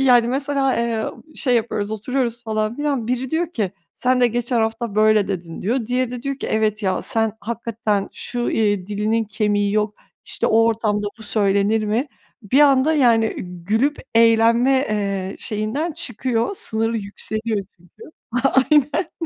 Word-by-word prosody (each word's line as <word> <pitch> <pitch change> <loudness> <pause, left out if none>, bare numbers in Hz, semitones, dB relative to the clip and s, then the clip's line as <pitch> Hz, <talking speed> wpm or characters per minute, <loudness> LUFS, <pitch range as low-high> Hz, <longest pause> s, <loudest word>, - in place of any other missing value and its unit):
Yani, 245 -3 +5
mesela, 275 0 0
eee, 230 -2 -1 0.3
şey 250 -4 +1
yapıyoruz, 215 -3 -1
oturuyoruz 235 +2 -2
falan 215 +1 -1
filan, 285 -6 -1
biri 250 +1 -2
diyor 335 +1 -1
ki, 210 - -1 0.3
"Sen 255 0 +2
de 245 - +6
geçen 240 0 0
hafta 225 -1 -2
böyle 215 -1 +4
dedin." 170 -4 -5
diyor. 230 +3 -1
Diğeri 250 0 0
de 250 -1 -6
diyor 275 -1 -3
ki, - - -4
"Evet 215 -1 0
ya, 185 -2 0
sen 225 -3 0
hakikaten 220 -2 -2
şu, 240 -1 -2
iii, 205 -4 +1
dilinin 215 +2 0
kemiği 205 -1 0
yok, 210 0 0 0.3
işte - - -1
o 225 +1 +4
ortamda 215 -2 0
bu - - -11
söylenir 205 +1 +1
mi?" 225 +7 0 0.4
Bir 255 +8 +2
anda, 280 +1 +5
yani, 230 -6 +3
gülüp 205 +11 -1 0.2
eğlenme, 230 +2 +5 0.2
eee, 195 -2 -2
şeyinden 230 +10 -2
çıkıyor, 240 -3 -1
sınırı 225 +1 -1
yükseliyor. 215 +2 -3 0.2
Çünkü, 175 - -19 0.5
aynen. 295 +5 +2
225 Hz, 155 wpm, -21 LUFS, 210-250 Hz, 0.5 s, de